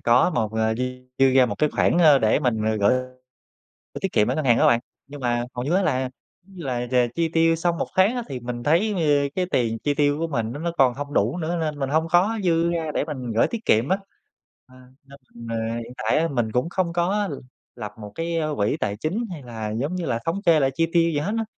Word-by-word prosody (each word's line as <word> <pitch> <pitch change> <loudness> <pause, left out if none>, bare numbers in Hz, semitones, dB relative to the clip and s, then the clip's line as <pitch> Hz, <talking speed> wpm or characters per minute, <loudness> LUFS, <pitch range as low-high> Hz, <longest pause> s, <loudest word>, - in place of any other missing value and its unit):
có 120 +9 +4
một 110 -6 -1
à, 110 0 +1
dư 125 +3 -1 0.3
dư 135 0 +5
ra 130 -1 +5
một - - -3
cái 150 - +3
khoản, 175 - +2
a, 155 -5 +6
để 110 +4 +2
mình, 110 -5 0
à, 110 - +1
gửi 100 - +4
gửi 130 0 -11 0.7
tiết 195 - -2
kiệm 105 +1 +3
ở 125 - 0
ngân 155 - -2
hàng 120 -3 +4
á - - +4
bạn. 120 - +4 0.3
Nhưng 145 +1 -10
mà 120 -1 0
hầu 125 0 -3
như 155 +6 0
á 195 - +3
là 140 -8 +1 0.4
giống 195 +2 -20
như 170 - -7
là 125 -2 -2
chà 125 -1 +3
chi 165 -1 0
tiêu 165 0 +3
xong 170 0 -1
một - - -1
tháng 195 +6 +4
á 245 - -2
thì 130 -3 -5
mình 120 0 -5
thấy, 165 - +2
giống 210 - -2
như, 145 -3 +2
cái 185 -1 0
tiền 115 -2 0
chi 145 +5 -1
tiêu 145 0 +2
của 165 - -1
mình 115 -7 -2
nó 140 - -6
nó 170 +1 -2
còn 130 -2 +4
không 145 +2 -6
đủ - - +1
nữa, 170 +1 -2
nên 155 -2 -2
mình 135 -1 -2
hông 160 +2 +1
có 195 +7 +3
dư 170 -1 +2
ra 165 -2 -2
để - - 0
mình 130 -6 -5
gửi 110 - +3
tiết 230 -1 -6
kiệm 115 - +3
á. 190 - +3 0.7
Ờ, 130 - -19 0.3
nên 140 +1 -15 0.2
mình 115 0 -9
à, 115 0 -2
hiện 115 - -10
tại 110 +6 +1
á 165 - +1
mình 120 -6 -1
cũng 125 +6 0
không 175 -1 -1
có 190 +4 0
l - - -4 0.4
lập 105 - -7
một 105 -1 -9
cái, 165 0 -2
a, 155 - 0
quỹ 105 +1 +1
tài 100 - -1
chính 175 - -2
hay 165 -5 -7
là 110 -3 -6
giống 145 +9 -2
như 180 -2 -3
là 115 - 0
thống 180 +5 -1
kê 160 -2 +5
lại 135 -1 +2
chi 165 +4 +1
tiêu 170 -1 +4
gì 150 - -1
hết 185 +8 -2
á. 225 - -1
145 Hz, 275 wpm, -23 LUFS, 120-170 Hz, 0.7 s, a